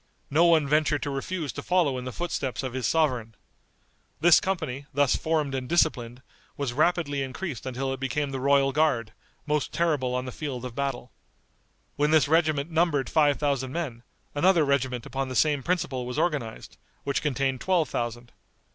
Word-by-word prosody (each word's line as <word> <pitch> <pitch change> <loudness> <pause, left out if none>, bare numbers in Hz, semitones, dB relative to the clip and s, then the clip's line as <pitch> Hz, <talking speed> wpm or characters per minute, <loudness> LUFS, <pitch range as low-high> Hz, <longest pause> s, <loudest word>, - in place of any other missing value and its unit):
No 160 +4 +5
one 160 -4 +4
ventured 150 0 +2
to 145 - -2
refuse 145 +2 -3
to - - -5
follow 175 -7 +2
in 125 - -7
the 130 - -4
footsteps 140 -5 -3
of 130 -2 -4
his 130 -3 -1
sovereign. 125 -8 0 0.8
This 170 +1 +7
company, 150 -8 -3
thus 145 -1 +2
formed 155 -4 -1
and 130 -1 -3
disciplined, 130 -7 +1 0.3
was 140 -4 -2
rapidly 150 -1 +1
increased 135 0 -5
until 135 +1 -2
it 135 - -6
became 140 +2 -2
the 135 - -3
royal 140 0 +3
guard, 135 -8 +1 0.3
most 150 -1 -1
terrible 145 -7 0
on 125 0 -2
the 125 - -5
field 130 -3 -5
of 125 - -6
battle. 135 -2 -3 0.9
When 145 +1 +2
this 155 -4 +4
regiment 155 -1 +2
numbered 160 -6 +1
five 145 -2 +3
thousand 135 -3 -1
men, 140 -9 -4 0.3
another 170 +1 +4
regiment 130 -4 0
upon 135 0 -3
the 130 - -5
same 150 -1 +3
principle 150 -6 -1
was 125 - -5
organized, 140 -10 -2 0.3
which 140 -1 -1
contained 135 -2 -1
twelve 180 -5 +2
thousand. 120 0 -4
140 Hz, 175 wpm, -26 LUFS, 130-155 Hz, 0.9 s, This